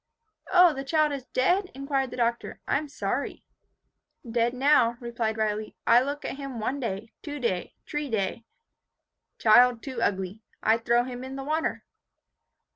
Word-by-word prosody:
"O, 360 Hz, -3 st, +7 dB
the 270 Hz, -1 st, -5 dB
child 305 Hz, +1 st, +2 dB
is 275 Hz, -3 st, -5 dB
dead?" 365 Hz, +9 st, +1 dB
inquired 275 Hz, -1 st, -1 dB
the -, -, -8 dB
Doctor. 235 Hz, 0 st, -1 dB
"I 275 Hz, -, +2 dB
am 300 Hz, -, -7 dB
sorry." 290 Hz, -, -3 dB, 0.8 s
"Dead 235 Hz, +1 st, +1 dB
now," 255 Hz, -2 st, +3 dB
replied 235 Hz, -2 st, -2 dB
Riley. 215 Hz, 0 st, -2 dB
"I 235 Hz, +1 st, +6 dB
look 285 Hz, +2 st, -4 dB
at -, -, -4 dB
him 275 Hz, -4 st, -6 dB
one 255 Hz, +6 st, -2 dB
day, 220 Hz, -2 st, -4 dB
two 290 Hz, -1 st, -6 dB
day, 190 Hz, -8 st, -2 dB
tree 295 Hz, -1 st, -3 dB
day. 220 Hz, 0 st, -1 dB, 0.9 s
Child 240 Hz, +1 st, +5 dB
too 260 Hz, -4 st, -5 dB
ugly. 195 Hz, 0 st, -1 dB, 0.2 s
I 225 Hz, +1 st, +4 dB
throw 235 Hz, +1 st, +2 dB
him 250 Hz, 0 st, -6 dB
in 265 Hz, +1 st, -6 dB
the 270 Hz, -, -5 dB
water." 310 Hz, +3 st, -1 dB
250 Hz, 160 wpm, -27 LUFS, 230-280 Hz, 0.9 s, O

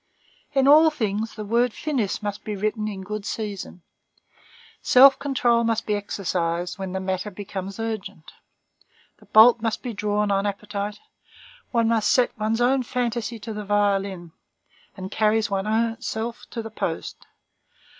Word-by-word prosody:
In 270 Hz, -1 st, +3 dB
all 310 Hz, +3 st, +8 dB
things 220 Hz, -6 st, -3 dB
the 215 Hz, -, -6 dB
word 235 Hz, +2 st, +1 dB
finis 245 Hz, -9 st, -2 dB
must 205 Hz, -1 st, -4 dB
be 210 Hz, -, -4 dB
written 215 Hz, +2 st, -2 dB
in 195 Hz, -3 st, -5 dB
good 210 Hz, +1 st, -5 dB
season; 200 Hz, -5 st, -5 dB, 1.0 s
self 270 Hz, +2 st, +7 dB
control 245 Hz, -4 st, +2 dB
must 230 Hz, -1 st, 0 dB
be 210 Hz, -, 0 dB
exercised 180 Hz, -3 st, -2 dB
when 190 Hz, -1 st, -4 dB
the 190 Hz, -, -2 dB
matter 190 Hz, +2 st, -2 dB
becomes 195 Hz, 0 st, -7 dB
urgent; 220 Hz, -8 st, -5 dB, 0.9 s
the -, -, -20 dB
bolt 225 Hz, +2 st, +7 dB
must 225 Hz, -1 st, -2 dB
be 245 Hz, -3 st, -4 dB
drawn 210 Hz, 0 st, 0 dB
on 195 Hz, +1 st, +1 dB
appetite; 205 Hz, 0 st, -4 dB, 0.7 s
one 230 Hz, -2 st, +1 dB
must 220 Hz, -3 st, +2 dB
set 250 Hz, -2 st, +3 dB
one's 220 Hz, +2 st, 0 dB
own 260 Hz, +2 st, +3 dB
fantasy 240 Hz, -1 st, -2 dB
to 220 Hz, +1 st, -6 dB
the 210 Hz, 0 st, -5 dB
violin, 200 Hz, -4 st, 0 dB, 0.7 s
and 190 Hz, +1 st, -7 dB
carry 215 Hz, +1 st, +2 dB
one's 220 Hz, +4 st, 0 dB
self 230 Hz, +2 st, -4 dB
to 230 Hz, -, -5 dB
the 225 Hz, -, -8 dB
post. -, -, -5 dB
215 Hz, 150 wpm, -24 LUFS, 200-230 Hz, 1.0 s, all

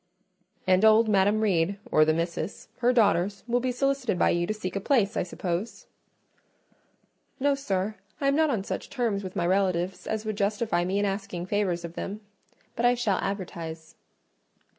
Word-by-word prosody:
"And 185 Hz, +1 st, +3 dB
old 220 Hz, +1 st, +6 dB
Madam 205 Hz, +1 st, +3 dB
Reed, 195 Hz, -2 st, +1 dB
or 155 Hz, -, +5 dB
the 155 Hz, -, +3 dB
Misses, 170 Hz, +4 st, -3 dB
her 245 Hz, 0 st, +3 dB
daughters, 200 Hz, -4 st, +2 dB
will 240 Hz, 0 st, +1 dB
be 255 Hz, +1 st, -1 dB
solicited 265 Hz, -5 st, 0 dB
by -, -, +3 dB
you 175 Hz, 0 st, 0 dB
to -, -, -1 dB
seek 185 Hz, -3 st, -5 dB
a -, -, 0 dB
place, 220 Hz, -1 st, +2 dB
I -, -, +1 dB
suppose?" 180 Hz, +3 st, -4 dB, 1.5 s
"No, 285 Hz, +1 st, +3 dB
sir; 210 Hz, -7 st, -1 dB, 0.3 s
I 280 Hz, -, 0 dB
am 275 Hz, -, +3 dB
not 315 Hz, 0 st, +3 dB
on 225 Hz, -8 st, 0 dB
such -, -, -5 dB
terms 230 Hz, -7 st, -1 dB
with 185 Hz, -1 st, -7 dB
my 170 Hz, -, 0 dB
relatives 185 Hz, -1 st, 0 dB
as 220 Hz, 0 st, -2 dB
would 215 Hz, -2 st, -3 dB
justify 205 Hz, -3 st, 0 dB
me 190 Hz, +2 st, -1 dB
in 205 Hz, -, +2 dB
asking 195 Hz, -3 st, -3 dB
favours 185 Hz, -3 st, -1 dB
of 170 Hz, -, -8 dB
them—but 210 Hz, +4 st, -8 dB
I 245 Hz, 0 st, +5 dB
shall 225 Hz, -6 st, 0 dB
advertise." 170 Hz, -5 st, -5 dB
200 Hz, 175 wpm, -27 LUFS, 180-225 Hz, 1.5 s, old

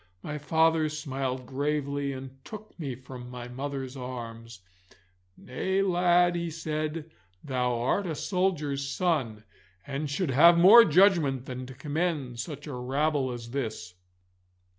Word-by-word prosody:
My 150 Hz, 0 st, -5 dB
father 160 Hz, +1 st, +2 dB
smiled 135 Hz, -4 st, -4 dB
gravely, 140 Hz, +1 st, -2 dB
and 135 Hz, 0 st, -9 dB
took 215 Hz, +4 st, -10 dB
me 140 Hz, -6 st, -4 dB
from 125 Hz, -1 st, -10 dB
my 125 Hz, -1 st, -7 dB
mother's 135 Hz, +1 st, -5 dB
arms. 115 Hz, -4 st, -8 dB, 0.8 s
'Nay, 190 Hz, +10 st, -1 dB
lad,' 175 Hz, -1 st, +3 dB
he 170 Hz, -1 st, -2 dB
said, 155 Hz, 0 st, -4 dB, 0.3 s
'thou 125 Hz, -3 st, -1 dB
art 180 Hz, +11 st, 0 dB
a 160 Hz, -, -3 dB
soldier's 150 Hz, -7 st, -1 dB
son, 135 Hz, -, -1 dB, 0.4 s
and 140 Hz, +1 st, -4 dB
should 145 Hz, +1 st, -1 dB
have 170 Hz, +6 st, +7 dB
more 210 Hz, +7 st, +9 dB
judgment 155 Hz, -7 st, +3 dB
than 125 Hz, -1 st, -6 dB
to 130 Hz, -, -10 dB
commend 145 Hz, -3 st, -2 dB
such 145 Hz, +4 st, -6 dB
a 150 Hz, -, -6 dB
rabble 135 Hz, +2 st, 0 dB
as 120 Hz, -1 st, -7 dB
this. 110 Hz, -9 st, -4 dB
140 Hz, 135 wpm, -28 LUFS, 125-165 Hz, 0.8 s, more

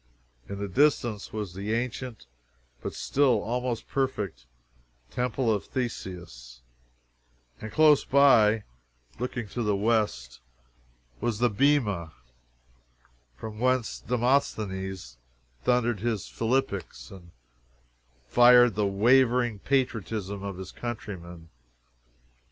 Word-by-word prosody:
In 100 Hz, -, -5 dB
the 100 Hz, 0 st, -3 dB
distance 120 Hz, -2 st, +1 dB
was 105 Hz, -5 st, -5 dB
the 100 Hz, +4 st, -2 dB
ancient, 125 Hz, -, -4 dB, 0.6 s
but -, -, -5 dB
still 130 Hz, -5 st, +2 dB
almost 120 Hz, 0 st, -3 dB
perfect 100 Hz, -, -3 dB, 0.6 s
Temple 125 Hz, -1 st, 0 dB
of 105 Hz, -, -3 dB
Theseus, 85 Hz, -, -6 dB, 1.0 s
and 110 Hz, -, -6 dB
close 155 Hz, -2 st, +5 dB
by, 115 Hz, -6 st, +5 dB, 0.6 s
looking 120 Hz, -2 st, -3 dB
to 120 Hz, -, -4 dB
the 105 Hz, -3 st, +1 dB
west, 105 Hz, -, 0 dB, 0.8 s
was 115 Hz, -, -1 dB
the 120 Hz, +1 st, +2 dB
Bema, 105 Hz, -, +1 dB, 1.2 s
from 105 Hz, -, -8 dB
whence 130 Hz, -1 st, 0 dB
Demosthenes 100 Hz, -, -1 dB, 0.5 s
thundered 120 Hz, -3 st, +1 dB
his 110 Hz, -4 st, -2 dB
philippics 110 Hz, -, -2 dB
and 90 Hz, -3 st, -13 dB, 1.0 s
fired 120 Hz, -, +6 dB
the 105 Hz, 0 st, 0 dB
wavering 120 Hz, +2 st, +3 dB
patriotism 110 Hz, -6 st, -1 dB
of 100 Hz, -2 st, -5 dB
his 95 Hz, -1 st, -8 dB
countrymen. 90 Hz, -8 st, -7 dB
110 Hz, 100 wpm, -27 LUFS, 95-125 Hz, 1.2 s, fired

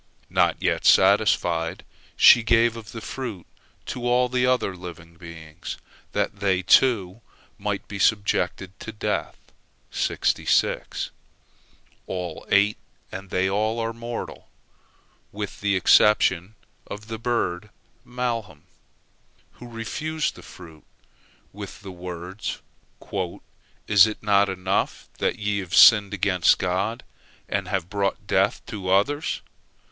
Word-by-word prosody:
Not -, -, +2 dB
yet -, -, 0 dB
satisfied, 85 Hz, +1 st, +3 dB, 0.3 s
she 120 Hz, -, +8 dB
gave 115 Hz, 0 st, +3 dB
of 115 Hz, -1 st, -10 dB
the 115 Hz, -, -7 dB
fruit 115 Hz, -10 st, -6 dB, 0.4 s
to 120 Hz, -1 st, -4 dB
all 125 Hz, +1 st, +2 dB
other 125 Hz, -6 st, +1 dB
living 85 Hz, -2 st, -10 dB
beings, 85 Hz, -1 st, -9 dB, 0.4 s
that 100 Hz, -, -2 dB
they, 95 Hz, -2 st, +1 dB
too, 100 Hz, -1 st, +3 dB, 0.4 s
might 105 Hz, -1 st, -3 dB
be 100 Hz, -, -7 dB
subject 105 Hz, -1 st, +1 dB, 0.2 s
to 110 Hz, -, -7 dB
death. 105 Hz, -, -3 dB, 2.7 s
All 90 Hz, -3 st, -5 dB
ate, 100 Hz, +1 st, +3 dB, 0.3 s
and 95 Hz, 0 st, -8 dB
they 95 Hz, +1 st, +1 dB
all 110 Hz, +4 st, 0 dB
are 115 Hz, 0 st, -2 dB
mortal, 115 Hz, 0 st, -7 dB, 0.8 s
with 105 Hz, -1 st, -6 dB
the 100 Hz, -1 st, +1 dB
exception 95 Hz, 0 st, +4 dB, 0.3 s
of 105 Hz, +1 st, -8 dB
the 110 Hz, -1 st, -6 dB
bird 110 Hz, -5 st, -2 dB, 0.3 s
malham, 115 Hz, -10 st, -4 dB, 0.9 s
who 125 Hz, -, -13 dB
refused 150 Hz, +7 st, -3 dB
the -, -, -13 dB
fruit, 80 Hz, -4 st, -14 dB, 0.7 s
with 100 Hz, -1 st, -9 dB
the 95 Hz, -, -8 dB
words: 90 Hz, +2 st, -6 dB, 1.3 s
"Is 105 Hz, 0 st, +6 dB
it 110 Hz, -, -7 dB
not 100 Hz, -1 st, +3 dB
enough 95 Hz, +1 st, -2 dB
that -, -, 0 dB
ye 105 Hz, -1 st, -1 dB
have 90 Hz, -2 st, -4 dB
sinned 105 Hz, -3 st, +7 dB
against 100 Hz, -3 st, +3 dB
God, 95 Hz, +6 st, -2 dB, 0.4 s
and 100 Hz, -2 st, -2 dB
have 95 Hz, -3 st, -2 dB
brought 100 Hz, 0 st, -2 dB
death -, -, +1 dB
to 95 Hz, -4 st, -6 dB
others? 140 Hz, +11 st, +1 dB
100 Hz, 115 wpm, -24 LUFS, 90-115 Hz, 2.7 s, she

